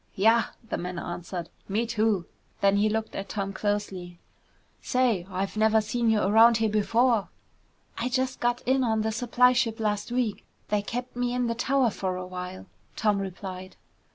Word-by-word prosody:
"Yah," 225 +4 +4 0.2
the - - -3
man 180 0 -5
answered, 175 0 -5 0.2
"me 215 +4 +1
too!" 215 -5 +1 0.3
Then 200 0 +3
he 210 +1 +3
looked 220 +1 -2
at 195 - -5
Tom 195 -1 -3
closely. 195 -3 -3 0.6
"Say, 235 -8 +1
I've 190 +2 -3
never 220 0 +4
seen 225 +2 0
you 220 -2 +3
around 225 +4 +6
here 220 -1 +1
before!" 225 +1 +2 0.7
"I 245 - -1
just 260 0 -1
got 240 +1 0
in 260 +1 +2
on 220 -2 +1
the 220 - 0
supply 245 +2 +3
ship 235 -3 0
last 210 +1 -1
week. 245 -4 -1 0.3
They 210 -1 +2
kept 245 +4 -5
me 245 0 -1
in 250 0 +1
the 230 - 0
tower 250 +1 +2
for 190 -2 -3
a 185 0 -5
while," 180 0 -7 0.3
Tom 210 -2 +1
replied. 190 -1 -6
215 Hz, 175 wpm, -27 LUFS, 195-240 Hz, 0.7 s, around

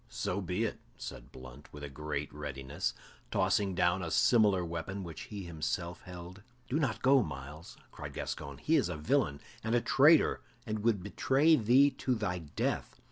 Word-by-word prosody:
"So 95 +3 -2
be 90 +4 -1
it," 110 - -2 0.2
said - - -8
Blunt, 65 +3 -12
with 75 -2 -8
great 75 0 -4
readiness, 70 -2 -4 0.3
tossing 95 0 +1
down 90 +1 +2
a 85 - -3
similar 100 -1 +4
weapon 85 +4 -4
which 85 -3 -7
he 100 -2 -6
himself 85 +1 -3
held. 90 +1 -10 0.3
"Do 145 - 0
not 110 -8 -1
go, 135 0 +6
Myles," 75 - -7
cried - - -8
Gascoyne, 70 -1 -5
"he - - +2
is - - +1
a 85 - -3
villain 75 -1 +1 0.2
and 110 +2 +1
a - - +5
traitor, 150 +5 +5 0.2
and 110 -2 -2
would 105 -3 +1
betray 135 - +3
thee 130 +4 +5
to 130 -2 -1
thy 105 -5 -2
death. 75 -4 -3
90 Hz, 170 wpm, -32 LUFS, 75-110 Hz, 0.3 s, go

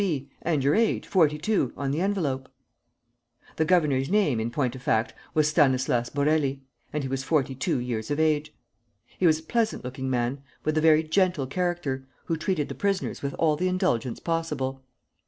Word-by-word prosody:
B., 140 -7 -2
and 155 -5 0
your 140 +2 +3
age, 225 +1 +1
forty 155 -6 +3
two, 175 - 0
on 140 0 -1
the 150 +4 -1
envelope!" 155 -10 -1 1.1
The 160 - +2
governor's 150 -6 +2
name, 185 - +2
in 110 +1 -1
point 125 0 -1
of 130 - -9
fact, 110 -2 +1 0.2
was 155 -1 +4
Stanislas 130 -6 +2
Borély, 140 -1 +1 0.3
and 150 -1 -2
he - - -2
was 135 0 -2
forty 140 -3 +1
two 130 0 -1
years 120 -3 -3
of 145 +1 -1
age. 155 -1 +1 0.7
He 180 - +4
was 155 -1 +4
a 160 - -11
pleasant 225 +5 0
looking 130 +1 -4
man, 125 +2 -1 0.2
with 155 - 0
a 155 - +2
very 160 0 +5
gentle 165 -3 +1
character, 145 -4 -2 0.2
who 165 - 0
treated 160 -2 -1
the - - -5
prisoners 200 -2 -1
with 140 -1 -3
all 155 -2 +2
the 180 +4 0
indulgence 180 - 0
possible. 150 -6 -2
150 Hz, 185 wpm, -26 LUFS, 130-165 Hz, 1.1 s, very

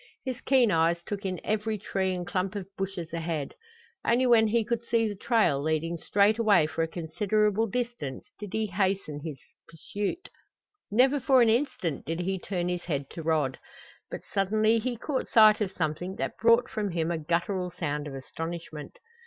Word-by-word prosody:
His 255 -2 -4
keen 255 -5 +4
eyes 165 +1 +2
took 200 0 -4
in 185 -2 -3
every 215 0 -1
tree 190 -2 -1
and 180 -1 -4
clump 185 +2 -2
of 200 -2 -4
bushes 190 -4 -4
ahead. 165 -4 -3 0.5
Only 245 +2 +3
when 230 -3 +5
he 225 +1 +1
could 235 +1 -1
see 230 -1 +1
the 210 - -3
trail 200 - +2
leading 160 +2 -1
straight 205 +6 +3
away 205 -8 +5
for 160 +1 -3
a 165 - +1
considerable 210 +6 0
distance 235 - -4
did 205 -2 -7
he 220 0 0
hasten 190 -6 -1
the 150 -3 -6 0.3
pursuit. 205 - -4 0.6
Never 260 +7 +4
for 265 -1 +5
an 230 - +4
instant 235 - -1
did 165 +2 -2
he 190 +1 -1
turn 175 -1 -3
his 180 -1 -3
head 140 -5 -3
to 165 - -6
Rod. 155 -5 0 0.5
But - - -6
suddenly 215 +3 +3
he 240 +1 -3
caught 265 +3 -2
sight 215 -1 +6
of 195 -3 0
something 175 +2 -3
that - - -4
brought 230 +2 +5
from 210 -2 -2
him 165 0 0
a 165 - -1
guttural 175 +3 -1
sound 150 -4 -3
of 140 - -7
astonishment. 160 +2 -7
195 Hz, 180 wpm, -28 LUFS, 165-220 Hz, 0.6 s, sight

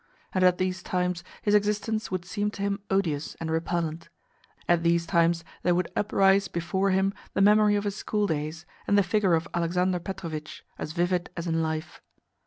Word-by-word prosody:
And 185 - +2
at 180 -1 +5
these 185 0 -1
times 180 -1 -1 0.2
his 205 - +2
existence 210 +1 +1
would 185 -2 -3
seem 205 +3 -1
to 200 - -3
him 200 0 0
odious 165 -7 0
and 160 -1 -4
repellent; 165 0 -2 0.6
at 175 -1 +3
these 170 0 +2
times 170 0 +2 0.2
there 175 0 +2
would 180 0 -1
uprise 195 -1 +3
before 175 +3 -1
him 195 +1 +2 0.2
the - - +1
memory 210 +1 +5
of 205 - 0
his 205 0 -3
school 210 -1 0
days, 155 0 -3 0.2
and 205 - +4
the 200 - +5
figure 190 -1 +2
of 160 +1 -1
Alexander 180 +2 +1
Petrovitch, 165 -4 -6
as 155 - -4
vivid 175 +1 0
as 170 - -3
in 165 -1 0
life. 160 0 -3
180 Hz, 185 wpm, -27 LUFS, 170-195 Hz, 0.6 s, at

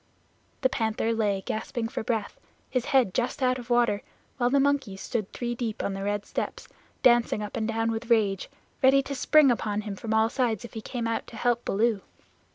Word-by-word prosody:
The 260 - +3
Panther 225 -2 0
lay 205 -4 0
gasping 225 +1 -3
for 225 - -4
breath, 220 -2 -2 0.3
his 255 -2 0
head 260 -9 +3
just 250 +2 -1
out 255 0 +2
of 240 - -9
the 245 - +1
water, 235 -4 +2 0.4
while 245 -1 +2
the 280 +2 +3
monkeys 275 -9 +1
stood 215 -3 -3
three 240 -1 -3
deep 230 -3 -3
on 200 - -1
the 195 0 -4
red 205 0 -1
steps, - - -4 0.4
dancing 240 -4 +4
up 210 - -6
and 220 -1 -1
down 225 0 0
with 225 +1 -4
rage, 205 -5 +2 0.3
ready 270 +1 +5
to 280 - -5
spring 280 +1 +5
upon 210 -3 -1
him 205 -2 -5
from 220 +3 -6
all 220 0 +4
sides 240 -4 0
if - - -11
he 220 - -5
came 235 +1 -4
out 230 0 -2
to - - -11
help 240 +1 +1
Baloo. 215 0 +1
230 Hz, 210 wpm, -27 LUFS, 215-245 Hz, 0.4 s, ready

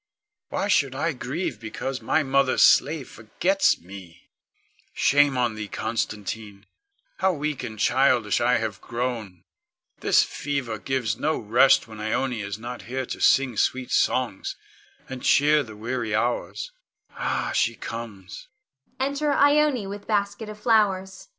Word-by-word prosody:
Why - - -1
should 140 -10 +2
I 155 +4 -1
grieve 135 - -4
because 125 +4 -5
my 160 - +1
mother's 135 -1 +3
slave 145 -2 +4
forgets 175 - +1
me? 90 -2 -13 0.6
Shame 145 -1 +3
on 120 -2 +1
thee, 105 -1 -6
Constantine! 105 -1 -4 0.5
How 190 - +2
weak 150 -2 -3
and 115 -4 -6
childish 125 -2 +2
have 115 -3 +1
I - - -19
grown! 115 -7 -4 0.6
This - - +4
fever 135 -6 -4
gives 125 -5 -2
no 155 +1 0
rest 120 +5 +4
when 110 -1 -11
Ione 115 +2 -1
is 100 0 -5
not 120 +2 -7
here 130 +1 -2
to - - -6
sing 130 -5 +3
sweet 130 -1 0
songs, 125 -7 0 0.5
and 130 -1 -7
cheer 150 +1 +4
the 110 -6 -9
weary 115 -1 -2
hours. 120 - -2 0.4
Ah, - - -2
she 115 - +1
comes! 110 -6 -8 0.5
[Enter 280 +2 0
Ione 285 -4 +3
_with 200 +1 -8
basket 205 0 -1
of 210 0 -9
flowers. 200 - +1
130 Hz, 140 wpm, -25 LUFS, 110-155 Hz, 0.6 s, slave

